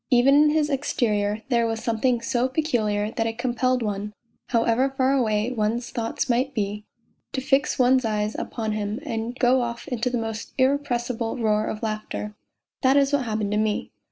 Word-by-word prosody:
Even 255 Hz, +2 st, +5 dB
in 300 Hz, +1 st, +6 dB
his 300 Hz, -1 st, +1 dB
exterior 215 Hz, -6 st, 0 dB
there 235 Hz, -2 st, +2 dB
was 225 Hz, 0 st, -3 dB
something 235 Hz, +1 st, +1 dB
so 250 Hz, 0 st, +1 dB
peculiar 220 Hz, -8 st, 0 dB
that 225 Hz, -1 st, -1 dB
it 225 Hz, 0 st, -4 dB
compelled 250 Hz, 0 st, 0 dB
one, 210 Hz, 0 st, -3 dB, 0.3 s
however 235 Hz, +3 st, +2 dB
far 265 Hz, 0 st, +3 dB
away 220 Hz, -3 st, +1 dB
one's 235 Hz, +1 st, -1 dB
thoughts 230 Hz, +1 st, -2 dB
might 255 Hz, +2 st, 0 dB
be, 210 Hz, -1 st, -2 dB, 0.5 s
to 270 Hz, -, -1 dB
fix 270 Hz, +2 st, +1 dB
one's 255 Hz, 0 st, +4 dB
eyes 215 Hz, -1 st, -1 dB
upon 220 Hz, -2 st, -3 dB
him 210 Hz, +1 st, -2 dB
and 235 Hz, -3 st, -4 dB
go 255 Hz, 0 st, +3 dB
off 235 Hz, -1 st, -4 dB
into 245 Hz, 0 st, -1 dB
the 245 Hz, -, -1 dB
most 225 Hz, -1 st, -5 dB
irrepressible 250 Hz, -4 st, 0 dB
roar 215 Hz, -2 st, +1 dB
of 215 Hz, -, -5 dB
laughter. 215 Hz, -1 st, -4 dB, 0.5 s
That 265 Hz, +1 st, +4 dB
is 280 Hz, 0 st, +3 dB
what 280 Hz, -3 st, +2 dB
happened 215 Hz, -2 st, -2 dB
to 210 Hz, -, +1 dB
me. 215 Hz, -1 st, -1 dB
235 Hz, 180 wpm, -24 LUFS, 215-260 Hz, 0.5 s, in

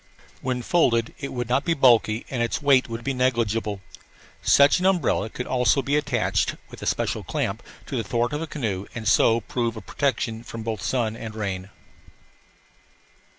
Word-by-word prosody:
When 125 Hz, -1 st, -2 dB
folded 115 Hz, -8 st, +2 dB
it 140 Hz, -, -5 dB
would 120 Hz, -2 st, -3 dB
not 130 Hz, +4 st, +1 dB
be 170 Hz, -1 st, +1 dB
bulky 120 Hz, -5 st, +4 dB
and 125 Hz, -3 st, -1 dB
its 115 Hz, -, 0 dB
weight 135 Hz, -4 st, +3 dB
would 115 Hz, +1 st, -5 dB
be 140 Hz, -, -1 dB
negligible. 115 Hz, -5 st, 0 dB, 0.6 s
Such 140 Hz, +5 st, +5 dB
an 185 Hz, -, +2 dB
umbrella 165 Hz, -, +1 dB
could 125 Hz, -, -5 dB
also 130 Hz, +2 st, +2 dB
be 140 Hz, +3 st, 0 dB
attached, 145 Hz, -4 st, 0 dB, 0.2 s
with -, -, -11 dB
a -, -, -4 dB
special -, -, -1 dB
clamp, -, -, -2 dB, 0.2 s
to -, -, -4 dB
the 115 Hz, -, -1 dB
thwart 120 Hz, +5 st, -1 dB
of 150 Hz, -, -2 dB
a 165 Hz, -, -3 dB
canoe 105 Hz, -11 st, -3 dB
and 110 Hz, -2 st, -4 dB
so 115 Hz, +1 st, +4 dB
prove 115 Hz, 0 st, -2 dB
a -, -, -4 dB
protection 130 Hz, -5 st, -1 dB
from 115 Hz, -1 st, -7 dB
both 110 Hz, -3 st, -3 dB
sun 110 Hz, +1 st, -1 dB
and 115 Hz, -1 st, -7 dB
rain. 100 Hz, -3 st, -4 dB
120 Hz, 180 wpm, -24 LUFS, 110-135 Hz, 0.6 s, Such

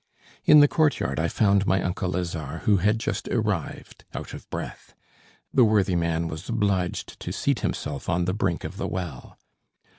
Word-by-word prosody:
In 150 Hz, -1 st, +8 dB
the 145 Hz, -, +7 dB
courtyard 145 Hz, -, +1 dB
I 80 Hz, -, +1 dB
found 100 Hz, +1 st, +2 dB
my 95 Hz, -, +3 dB
uncle 90 Hz, 0 st, -2 dB
Lazare, 85 Hz, -5 st, -3 dB
who 105 Hz, -2 st, +3 dB
had 105 Hz, +4 st, +2 dB
just 110 Hz, -, -3 dB
arrived 105 Hz, -, -2 dB
out -, -, -6 dB
of -, -, -10 dB
breath. -, -, -7 dB, 0.6 s
The 130 Hz, -, +6 dB
worthy 105 Hz, -4 st, +3 dB
man 85 Hz, -1 st, 0 dB
was 80 Hz, +6 st, -7 dB
obliged 100 Hz, -6 st, -1 dB
to -, -, -5 dB
seat -, -, 0 dB
himself 70 Hz, -, -3 dB
on 90 Hz, 0 st, +1 dB
the 90 Hz, -, 0 dB
brink 95 Hz, -4 st, -1 dB
of -, -, -6 dB
the -, -, -2 dB
well. 85 Hz, -9 st, -6 dB
95 Hz, 175 wpm, -25 LUFS, 85-105 Hz, 0.6 s, In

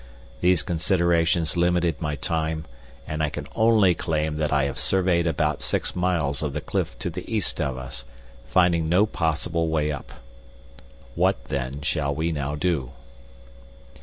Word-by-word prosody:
These 90 Hz, +1 st, +3 dB
considerations 85 Hz, -2 st, +2 dB
limited 85 Hz, -2 st, +1 dB
my 75 Hz, -2 st, -1 dB
time, 80 Hz, +1 st, -2 dB, 0.4 s
and 75 Hz, 0 st, -3 dB
I 75 Hz, -, +1 dB
can -, -, -6 dB
only 110 Hz, -5 st, +5 dB
claim 80 Hz, -2 st, -1 dB
that 75 Hz, -1 st, 0 dB
I 70 Hz, -1 st, +3 dB
have 70 Hz, -1 st, -2 dB
surveyed 90 Hz, -3 st, +2 dB
about 80 Hz, -4 st, 0 dB
six -, -, -1 dB
miles 85 Hz, -6 st, 0 dB
of 75 Hz, -3 st, -2 dB
the 75 Hz, -, -2 dB
cliff -, -, -2 dB
to -, -, -3 dB
the -, -, -7 dB
east -, -, 0 dB
of 65 Hz, -1 st, -1 dB
us, 65 Hz, -1 st, -5 dB, 0.4 s
finding 85 Hz, -3 st, +3 dB
no 90 Hz, +5 st, +5 dB
possible 85 Hz, -3 st, -1 dB
way 75 Hz, -1 st, +1 dB
up. 75 Hz, -, -7 dB, 1.0 s
What, -, -, +1 dB
then, 70 Hz, +1 st, -3 dB
shall 70 Hz, -2 st, -1 dB
we 80 Hz, +2 st, 0 dB
now 75 Hz, -1 st, -2 dB
do?" 75 Hz, -5 st, -1 dB
80 Hz, 155 wpm, -25 LUFS, 75-85 Hz, 1.0 s, only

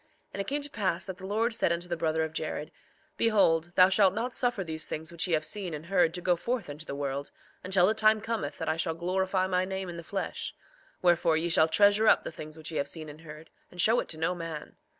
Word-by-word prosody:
3:21 -, -, -37 dB, 0.3 s
And 200 Hz, -, -3 dB
it 195 Hz, -, -6 dB
came 290 Hz, +2 st, -1 dB
to 290 Hz, -, -3 dB
pass 190 Hz, -7 st, -1 dB
that 190 Hz, -2 st, -6 dB
the 190 Hz, -, -7 dB
Lord 225 Hz, +4 st, 0 dB
said 225 Hz, -, +1 dB
unto 170 Hz, +1 st, -2 dB
the 175 Hz, -, -2 dB
brother 160 Hz, -1 st, 0 dB
of 160 Hz, 0 st, -4 dB
Jared: 155 Hz, -1 st, -4 dB, 0.5 s
Behold, 175 Hz, -7 st, +3 dB
thou 185 Hz, 0 st, +8 dB
shalt 195 Hz, 0 st, +4 dB
not 240 Hz, +3 st, -2 dB
suffer 245 Hz, -6 st, 0 dB
these 160 Hz, -2 st, -3 dB
things 160 Hz, +1 st, -5 dB
which 170 Hz, +2 st, -2 dB
ye 170 Hz, -, +2 dB
have 155 Hz, 0 st, -1 dB
seen 185 Hz, -5 st, -2 dB
and 150 Hz, +2 st, -8 dB
heard 175 Hz, -2 st, +2 dB
to 180 Hz, -, -4 dB
go 180 Hz, 0 st, +2 dB
forth 225 Hz, -2 st, -3 dB
unto 150 Hz, +2 st, -9 dB
the 140 Hz, -, -4 dB
world, 140 Hz, 0 st, -3 dB, 0.3 s
until 185 Hz, -1 st, +4 dB
the 210 Hz, -, +3 dB
time 220 Hz, 0 st, +4 dB
cometh 210 Hz, -10 st, -3 dB
that -, -, -4 dB
I 155 Hz, +1 st, 0 dB
shall 165 Hz, -1 st, -1 dB
glorify 185 Hz, +2 st, 0 dB
my 185 Hz, -1 st, +1 dB
name 190 Hz, 0 st, -4 dB
in 170 Hz, -, -7 dB
the 170 Hz, -, -7 dB
flesh; 195 Hz, +4 st, -4 dB, 0.5 s
wherefore, 170 Hz, -2 st, +4 dB
ye 170 Hz, +2 st, -1 dB
shall 160 Hz, -1 st, +5 dB
treasure 205 Hz, +5 st, +5 dB
up -, -, +5 dB
the -, -, -5 dB
things 155 Hz, 0 st, -9 dB
which 160 Hz, +1 st, -7 dB
ye 155 Hz, -, -3 dB
have 140 Hz, -, 0 dB
seen 155 Hz, +1 st, -6 dB
and 150 Hz, +2 st, -12 dB
heard, 155 Hz, 0 st, -12 dB, 0.2 s
and 180 Hz, -, -14 dB
show 225 Hz, +7 st, +5 dB
it -, -, -3 dB
to 160 Hz, -, -3 dB
no 165 Hz, +3 st, 0 dB
man. 165 Hz, -3 st, -7 dB
175 Hz, 265 wpm, -29 LUFS, 160-195 Hz, 0.5 s, thou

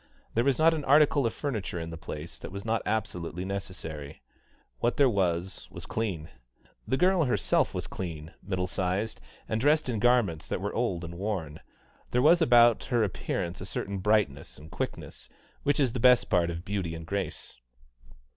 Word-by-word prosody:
There 115 Hz, -, +2 dB
was 135 Hz, -1 st, +2 dB
not 165 Hz, +1 st, +5 dB
an 155 Hz, -2 st, -2 dB
article 145 Hz, -2 st, +5 dB
of 115 Hz, -, -3 dB
furniture 110 Hz, -, -3 dB
in 80 Hz, 0 st, -5 dB
the -, -, -6 dB
place 80 Hz, 0 st, -8 dB
that -, -, -8 dB
was 100 Hz, +2 st, -7 dB
not 115 Hz, 0 st, +1 dB
absolutely 90 Hz, -5 st, -2 dB
necessary; 80 Hz, -6 st, -6 dB, 0.6 s
what 120 Hz, -, 0 dB
there 140 Hz, -, +6 dB
was 95 Hz, -4 st, -1 dB
was -, -, -9 dB
clean. 95 Hz, -9 st, -3 dB, 0.6 s
The 130 Hz, -, +1 dB
girl 180 Hz, -1 st, +3 dB
herself 125 Hz, -, +1 dB
was -, -, -3 dB
clean, 80 Hz, -4 st, -6 dB
middle 95 Hz, -2 st, -2 dB
sized, 95 Hz, -, -2 dB, 0.3 s
and 110 Hz, 0 st, -1 dB
dressed 150 Hz, +1 st, +3 dB
in 115 Hz, -3 st, -1 dB
garments 115 Hz, -9 st, +2 dB
that -, -, -2 dB
were -, -, -3 dB
old 85 Hz, -1 st, -1 dB
and 85 Hz, 0 st, -7 dB
worn; 90 Hz, -7 st, -3 dB, 0.5 s
there 125 Hz, -, +1 dB
was 170 Hz, +3 st, +6 dB
about 120 Hz, -5 st, +5 dB
her 120 Hz, -3 st, +2 dB
appearance 90 Hz, -2 st, -3 dB
a -, -, -5 dB
certain 100 Hz, +1 st, -3 dB
brightness 100 Hz, -9 st, +1 dB
and 75 Hz, +2 st, -13 dB
quickness, -, -, -5 dB, 0.3 s
which 145 Hz, +1 st, +1 dB
is 130 Hz, -5 st, +2 dB
the -, -, -2 dB
best 125 Hz, 0 st, +5 dB
part 85 Hz, -1 st, +3 dB
of 85 Hz, +1 st, -5 dB
beauty 95 Hz, -5 st, -2 dB
and 80 Hz, 0 st, -8 dB
grace. 100 Hz, -5 st, -4 dB
100 Hz, 180 wpm, -28 LUFS, 85-120 Hz, 0.6 s, there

